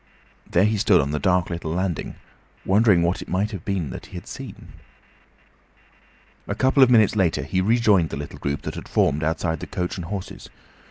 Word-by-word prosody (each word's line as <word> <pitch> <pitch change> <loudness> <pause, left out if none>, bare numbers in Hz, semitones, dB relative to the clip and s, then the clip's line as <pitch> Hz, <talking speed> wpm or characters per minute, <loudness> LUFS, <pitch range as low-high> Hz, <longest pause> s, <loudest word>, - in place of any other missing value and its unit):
There 90 - +3
he 105 0 +1
stood 95 -3 +4
on 70 0 0
the 75 - -1
dark 90 -1 +1
little 85 -2 -4
landing, 90 0 -2 0.5
wondering 100 -3 +4
what 85 +2 0
it - - -9
might 100 -1 -2
be 100 -2 -1
that 80 -6 -6
he - - -13
had - - -7
seen. - - -9 1.8
A 100 - -2
couple 130 +4 +3
of 130 - +7
minutes 110 -3 +4
after, 90 -9 +1
he 90 +6 -1
rejoined 105 -5 +3
the - - -5
little 75 - -8
group 70 +1 -3
that - - -4
had - - -9
formed 75 +2 +1
outside 80 +1 -1
the - - -7
"Coach 90 +1 -3
and 90 - -5
Horses." 95 +1 -7
90 Hz, 195 wpm, -23 LUFS, 80-105 Hz, 1.8 s, of